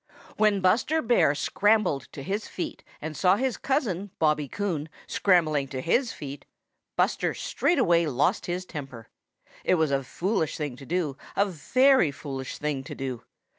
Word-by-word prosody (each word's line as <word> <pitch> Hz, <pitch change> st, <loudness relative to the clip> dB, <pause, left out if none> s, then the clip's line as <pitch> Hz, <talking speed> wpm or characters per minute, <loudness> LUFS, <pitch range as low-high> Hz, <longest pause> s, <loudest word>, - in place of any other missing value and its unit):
|WHEN 210 Hz, -2 st, +3 dB
Buster 235 Hz, +12 st, +3 dB
Bear 230 Hz, -, +3 dB
scrambled 190 Hz, -, +2 dB
to 140 Hz, -, -8 dB
his 200 Hz, +8 st, -3 dB
feet 180 Hz, -, -5 dB, 0.2 s
and 155 Hz, 0 st, -4 dB
saw 185 Hz, +3 st, +4 dB
his 255 Hz, +2 st, 0 dB
cousin, 205 Hz, -, -1 dB
Bobby 150 Hz, -2 st, +2 dB
Coon, 165 Hz, -4 st, -3 dB, 0.2 s
scrambling 155 Hz, -7 st, +2 dB
to 130 Hz, -1 st, -5 dB
his 230 Hz, -, +1 dB
feet, 140 Hz, -1 st, -8 dB, 0.5 s
Buster -, -, +1 dB
straightway 170 Hz, -, +2 dB
lost 150 Hz, -, +1 dB
his 180 Hz, +1 st, -2 dB
temper. 135 Hz, -9 st, -8 dB, 0.5 s
It -, -, +3 dB
was 160 Hz, -4 st, +1 dB
a 135 Hz, 0 st, +1 dB
foolish 170 Hz, -, -1 dB
thing 145 Hz, -5 st, -3 dB
to 135 Hz, -, -12 dB
do, 165 Hz, -6 st, -1 dB, 0.2 s
a 200 Hz, -, +4 dB
very 255 Hz, -, +3 dB
foolish 135 Hz, -2 st, -6 dB
thing 145 Hz, -3 st, -2 dB
to -, -, -7 dB
do. 130 Hz, -3 st, -4 dB
165 Hz, 155 wpm, -27 LUFS, 140-205 Hz, 0.5 s, saw